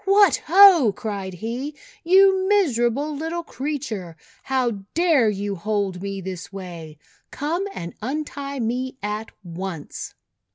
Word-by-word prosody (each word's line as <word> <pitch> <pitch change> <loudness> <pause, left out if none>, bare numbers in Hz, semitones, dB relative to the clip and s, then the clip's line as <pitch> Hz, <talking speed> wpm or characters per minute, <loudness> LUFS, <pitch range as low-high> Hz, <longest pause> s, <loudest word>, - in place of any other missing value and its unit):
"What! 395 -1 +5
Ho!" 350 - +8
cried 195 -4 -4
he. 245 - -4 0.3
"You 380 +2 +5
miserable 290 - +2
little 325 +3 -3
creature, 255 - -5 0.2
how 260 -3 0 0.2
dare 320 -9 +4
you 205 0 -2
hold 195 -1 -2
me 195 0 -4
this 185 -1 -7
way? 170 -5 -8 0.3
Come 335 +7 -2
and 170 - -7
untie 280 +2 -4
me 250 +3 -2
at 210 +2 -3
once." 175 -2 -6
240 Hz, 120 wpm, -23 LUFS, 195-310 Hz, 0.3 s, Ho